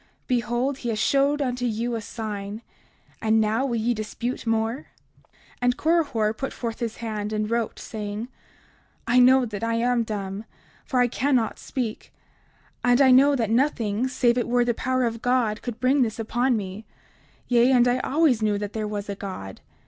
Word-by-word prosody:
Behold, 245 +2 -1
he 240 - -3
has 220 - -1
showed 280 +5 +2
unto 250 -1 -2
you 235 0 -1
a 225 - -2
sign; 210 0 -6 0.6
and 220 0 +3
now 220 +5 +1
will 240 - -1
ye 230 +2 +1
dispute 235 +3 -4
more? 225 +4 -1 0.4
30:52 - - -45 0.3
And 245 0 +2
Korihor 290 -10 +1
put 270 - -4
forth 230 -2 -5
his 230 -2 -3
hand 210 -1 -3
and 215 0 -1
wrote, 230 -1 -1
saying: 210 +1 -5 0.8
I 250 +1 +4
know 255 +1 +6
that 210 -2 -6
I 230 0 0
am 240 +1 +2
dumb, 205 -2 -4 0.4
for 255 -2 +1
I 245 - +4
cannot 250 -2 0
speak; 235 -5 -5 0.7
and 245 0 +4
I 265 -2 +6
know 275 +3 +6
that 225 -4 -1
nothing 235 -3 +1
save 250 -2 +2
it 240 - -1
were 245 0 +2
the 240 - +1
power 255 +2 0
of 230 -1 -2
God 245 -4 +1
could 240 -2 -6
bring 260 +3 +3
this 225 -4 0
upon 240 +2 0
me; 200 +1 -6 0.6
yea, 245 +1 +4
and 245 -2 +5
I 245 +1 +2
always 280 -4 +2
knew 210 -1 +1
that 205 0 -5
there 215 -1 -2
was 205 -1 -4
a 200 - -3
God. 185 - -7
235 Hz, 185 wpm, -24 LUFS, 215-250 Hz, 0.8 s, know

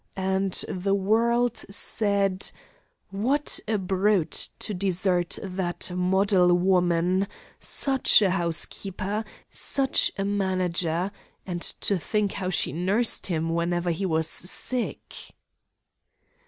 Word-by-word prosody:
And 190 0 -1
the 195 +2 -1
world 235 +4 +1
said: 200 -2 +1 0.6
'What 255 +9 +1
a 215 0 0
brute 190 -1 +2
to 215 - +2
desert 180 -2 +1
that 185 -2 -2
model 180 0 +3
woman! 180 +1 +1 0.3
Such 265 -5 +4
a 190 - +2
housekeeper! 190 +4 -1 0.3
Such 270 -2 +1
a 195 - -2
manager! 185 -3 -1 0.3
And 175 -2 -5 0.2
to 200 -3 +1
think 210 +3 -1
how 185 -2 -4
she 175 - 0
nursed 195 +8 0
him 165 -3 -2
whenever 175 +1 -1
he 190 +4 -2
was 160 -2 0
sick!' 230 +9 -3
190 Hz, 105 wpm, -25 LUFS, 180-205 Hz, 0.6 s, Such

